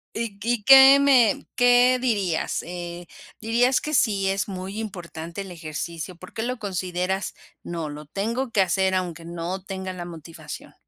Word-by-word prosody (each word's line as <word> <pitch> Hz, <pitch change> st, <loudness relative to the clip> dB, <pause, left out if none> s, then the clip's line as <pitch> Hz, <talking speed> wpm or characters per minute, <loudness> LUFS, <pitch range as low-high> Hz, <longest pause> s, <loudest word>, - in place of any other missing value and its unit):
Y 225 Hz, -3 st, -4 dB
y 235 Hz, -2 st, 0 dB
¿qué 270 Hz, +2 st, +9 dB
me 255 Hz, -7 st, +4 dB
qué 245 Hz, 0 st, +5 dB
dirías, 200 Hz, -9 st, -1 dB
eh, 175 Hz, 0 st, -7 dB, 0.3 s
dirías 240 Hz, +4 st, +2 dB
que 305 Hz, -, -5 dB
sí 200 Hz, -7 st, +2 dB
es 195 Hz, +1 st, -1 dB
muy 190 Hz, +2 st, -6 dB
importante 175 Hz, -3 st, -7 dB
el 190 Hz, -2 st, -8 dB
ejercicio? 165 Hz, +1 st, -6 dB
Por 185 Hz, +2 st, -13 dB
qué 220 Hz, -, -4 dB
lo 250 Hz, +2 st, -2 dB
consideras: 185 Hz, -1 st, -3 dB, 0.3 s
"No, 165 Hz, -3 st, -5 dB
lo 150 Hz, +1 st, -8 dB
tengo 230 Hz, -, -2 dB
que 200 Hz, -, +3 dB
hacer, 190 Hz, +1 st, +1 dB
aunque 175 Hz, -3 st, -3 dB
no 175 Hz, +3 st, -5 dB
tenga 190 Hz, -1 st, -5 dB
la 175 Hz, -1 st, -7 dB
motivación". 165 Hz, -1 st, -10 dB
190 Hz, 160 wpm, -24 LUFS, 175-230 Hz, 0.3 s, qué